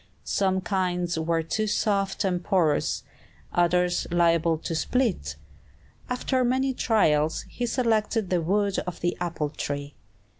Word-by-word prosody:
Some 190 -1 +1
kinds 180 -3 -1
were 165 0 0
too 215 +6 -1
soft 200 -2 0
and 180 -2 0
porous, 170 -7 +1 0.5
others 175 0 +2
liable 170 -1 +3
to 165 - -5
split. 175 - 0 0.7
After 255 +1 0
many 260 +2 +1
trials, 160 -11 +2
he 245 - -3
selected 225 -4 0
the 180 -2 +2
wood 200 +3 +1
of 180 - -5
the 175 0 0
apple 160 -4 -2
tree. 145 -1 -4
180 Hz, 125 wpm, -26 LUFS, 165-215 Hz, 0.7 s, liable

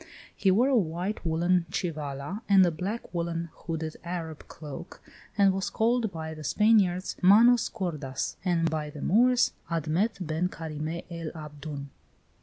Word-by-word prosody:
He 195 - +2
wore 225 +8 +4
a 270 - +3
white 180 0 -1
woollen 170 +1 +1
chivala 155 +1 -4
and 195 -2 +7
a 175 - +2
black 190 +9 -5
woollen, 170 -1 -2
hooded 160 -2 -5
Arab 170 -3 -5
cloak, 155 +3 -9 0.4
and 195 -2 +5
was 190 0 -2
called 230 -1 +1
by 160 -1 -5
the 155 -1 -9
Spaniards, 195 0 +3
Manos 230 +6 +6
gordas, 155 - -3
and 170 -3 +2
by 155 -2 -2
the 145 -1 -8
Moors, 250 +5 +4 0.2
Admet 170 +6 0
Ben 160 +3 0
Carime 160 +1 -5
el 165 -2 -4
Abdoun. 150 -2 -7
170 Hz, 145 wpm, -28 LUFS, 155-195 Hz, 0.4 s, and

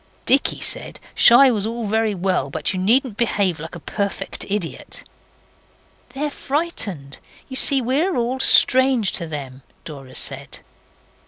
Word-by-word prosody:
Dicky 270 +2 +2
said - - -1
shy 255 +2 +7
was 210 -2 -1
all 230 0 -5
very 220 0 0
well, 185 -6 -1
but 155 +5 -2
you 185 - -3
needn't 225 +3 +1
behave 200 -7 0
like 160 +3 -9
a - - -8
perfect 200 +5 -4
idiot. 195 -5 -4 1.1
'They're 290 +2 -4
frightened. 225 - -3 0.3
You 260 - -9
see 270 0 +3
we're 290 +10 0
all 245 +2 -2
strange 260 -5 +4
to 170 - -3
them,' 135 -4 -8 0.2
Dora 135 -4 -10
said. - - -1
215 Hz, 140 wpm, -20 LUFS, 170-260 Hz, 1.1 s, shy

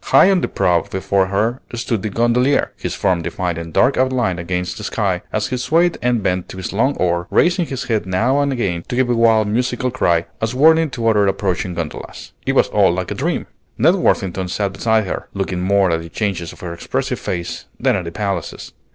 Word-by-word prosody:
High 195 - +6
on 185 -2 +2
the - - 0
prow 85 -2 +2
before 95 +1 0
her 110 +6 0
stood 115 -3 -2
the 110 - -2
gondolier, 120 +5 +2
his - - -4
form 90 -2 +1
defined 85 0 -3
in 85 0 -7
dark 130 - +3
outline 125 -8 +1
against 90 +1 -3
the - - -7
sky, - - -1
as - - -1
he 130 - -1
swayed 165 +7 +2
and 120 -3 +1
bent 90 -2 -1
to - - -8
his 95 - -5
long 130 +7 +1
oar, 85 0 0
raising 175 -1 +2
his 135 -2 -4
head 110 -6 -1
now 115 +10 +1
and 140 -1 +1
again 90 -10 -1
to - - -3
give 125 -1 +2
a - - +2
wild 115 -2 +4
musical 125 +3 -1
cry, 85 -9 +1 0.2
as 110 +2 -1
warning 160 +3 +5
to 120 -4 -2
other 105 -3 +4
approaching 95 -2 -1
gondolas. 85 -3 -6 0.2
It - - +2
was - - +4
all - - +4
like 90 0 -3
a - - 0
dream. - - -2 0.3
Ned 160 +9 +5
Worthington 95 - 0
sat 100 +2 -2
beside 110 +2 +1
her, - - -5
looking 95 -2 -2
more 95 -1 +3
at 80 0 0
the 85 - -9
changes 90 -3 -2
in - - -14
her 85 - -4
expressive 85 - -3
face 85 -1 -4
than - - +2
at 95 -3 -3
the 85 - -5
palaces. 100 +1 -4
105 Hz, 220 wpm, -19 LUFS, 90-125 Hz, 0.3 s, High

